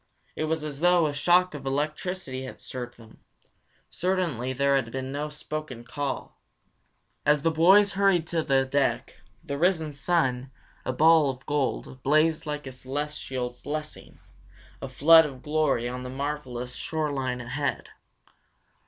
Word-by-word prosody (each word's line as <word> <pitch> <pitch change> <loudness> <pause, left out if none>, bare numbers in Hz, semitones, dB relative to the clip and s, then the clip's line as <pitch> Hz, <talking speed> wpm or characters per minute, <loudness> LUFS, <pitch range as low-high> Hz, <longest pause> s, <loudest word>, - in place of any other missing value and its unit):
It 155 - -1
was 160 0 -1
as 145 -2 -5
though 175 0 +4
a 150 - -1
shock 180 +4 +3
of 145 -2 -7
electricity 145 0 -3
had 130 - -9
stirred 120 -1 -7
them. 115 -2 -17 0.7
Certainly 170 -9 -1
there 140 +1 +2
had 130 -4 0
been 130 +1 -4
no 145 +2 -3
spoken 150 -4 -6
call. 140 +3 -5 0.8
As 150 -1 +3
the 165 - +3
boys 190 +6 +5
hurried 195 -4 +2
to 165 -2 0
the 135 -3 +2
deck, 140 +1 0 0.3
the 140 0 -4
risen 160 -3 +1
sun, 135 -5 0 0.4
a - - 0
ball 155 +2 +5
of 130 -1 -6
gold, 135 -2 -2
blazed 155 +3 +2
like 150 -1 -4
a 130 - -6
celestial 130 -2 -4
blessing, 150 +1 -6 0.6
a 135 - -5
flood 160 +4 +7
of 135 -3 -11
glory 150 -6 +1
on 125 +1 -5
the 125 - -6
marvelous 130 -3 -4
shore 155 -2 -2
line 130 -3 -2
ahead. 140 +4 -3
145 Hz, 150 wpm, -26 LUFS, 130-160 Hz, 0.8 s, flood